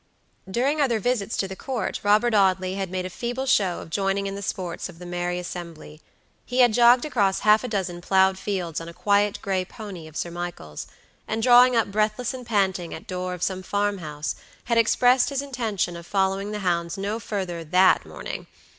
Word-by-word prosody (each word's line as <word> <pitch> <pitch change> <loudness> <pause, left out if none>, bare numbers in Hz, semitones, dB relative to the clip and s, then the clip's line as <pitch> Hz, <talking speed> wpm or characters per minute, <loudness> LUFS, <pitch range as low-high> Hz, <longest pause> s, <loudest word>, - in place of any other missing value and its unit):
During 270 +9 +1
other 240 -5 +2
visits 225 -1 -1
to 195 - 0
the 190 - -7
Court 255 +2 -3
Robert 215 +3 +3
Audley 190 -2 +3
had 195 -1 -3
made 185 0 -3
a - - -4
feeble 245 +6 -3
show 195 -9 +2
of - - -11
joining 195 +2 0
in 195 - -3
the 200 - -6
sports 185 -2 -4
of 170 - -12
the 180 - -10
merry 175 0 -2
assembly. 170 -3 -8 0.4
He 250 +1 +1
had 240 -3 +5
jogged 240 +2 +6
across 200 -10 +1
half 215 +2 +5
a - - -2
dozen 185 -6 -3
ploughed 190 +1 +3
fields 180 -6 -3
on 165 - -7
a 170 - -12
quiet 205 +1 +2
gray 190 -2 0
pony 190 -4 -9
of 155 - -10
Sir 170 - -3
Michael's, 175 - -6 0.4
and 220 +1 -2
drawing 250 +1 +7
up 225 -3 +1
breathless 215 +4 0
and 250 -2 -8
panting 190 -5 0
at 160 - -9
the - - -8
door 180 0 -3
of 180 - -6
some 185 -1 -1
farm 205 +1 -1
house, 150 -2 -4 0.3
had 235 -1 +2
expressed 245 +2 +4
his 280 -1 -2
intention 225 -10 -2
of 170 0 -10
following 195 0 0
the 210 0 -4
hounds 170 +1 0
no 205 +3 -2
further 185 -6 -4
that 180 +4 +4
morning. - - -7
195 Hz, 205 wpm, -24 LUFS, 180-225 Hz, 0.4 s, drawing